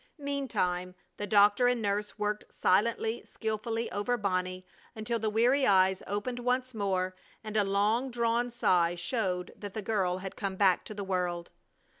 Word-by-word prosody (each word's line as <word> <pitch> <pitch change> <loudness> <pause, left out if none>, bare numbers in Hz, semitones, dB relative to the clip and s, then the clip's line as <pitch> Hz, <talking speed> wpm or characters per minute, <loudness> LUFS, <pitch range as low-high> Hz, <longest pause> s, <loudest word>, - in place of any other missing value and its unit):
Meantime 205 - -2 0.2
the 205 - -4
doctor 205 +4 +5
and 245 -1 +2
nurse 210 0 -2
worked 210 0 -2
silently, 225 +4 +1
skilfully 225 +1 -3
over 225 +4 0
Bonnie 185 -3 -2 0.3
until 225 +1 -2
the 220 0 0
weary 245 +6 +3
eyes 190 -1 +4
opened 205 +5 -3
once 250 +1 0
more, 185 -3 -1 0.3
and 215 -1 -6
a 210 - +4
long 210 +6 +1
drawn 235 0 0
sigh 175 -7 +2
showed 180 0 -2
that 205 -1 -8
the 215 - -2
girl 190 -4 0
had 190 0 -7
come 195 -2 -3
back 190 -2 +3
to 215 - -8
the 200 - -4
world. 180 -2 -2
210 Hz, 160 wpm, -30 LUFS, 185-235 Hz, 0.3 s, doctor